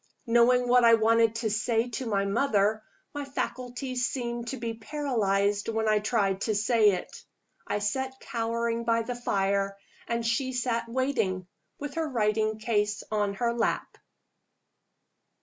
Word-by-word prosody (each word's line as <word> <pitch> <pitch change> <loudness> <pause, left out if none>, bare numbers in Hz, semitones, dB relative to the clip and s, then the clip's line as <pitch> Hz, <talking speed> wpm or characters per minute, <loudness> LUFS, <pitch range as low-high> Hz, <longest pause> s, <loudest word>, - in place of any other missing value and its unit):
Knowing 240 +1 +4
what 245 0 +5
I 230 -1 +8
wanted 225 0 +3
to 225 -2 -1
say 225 +2 0
to 245 +2 -4
my 200 -2 +1
mother, 215 -1 +1 0.3
my 290 -1 -4
faculties 250 -2 -3
seemed 235 -2 -4
to 265 - -3
be 230 -1 -3
paralyzed 215 -6 0
when 220 -1 0
I 215 -1 +4
tried 205 -3 0
to 215 - 0
say 215 -1 +4
it. 180 - -6 0.4
I - - 0
sat 265 +6 -2
cowering 230 -1 -2
by 230 0 +1
the 245 - -4
fire 195 -4 0 0.3
and 235 0 -1
she 260 +3 0
sat 235 -2 -1
waiting, 230 -8 0 0.3
with 290 -1 -6
her 325 -1 -2
writing 215 -3 +1
case 210 -2 0
on 205 -2 0
her 235 +3 0
lap. 235 -1 -2
230 Hz, 150 wpm, -28 LUFS, 210-245 Hz, 0.4 s, I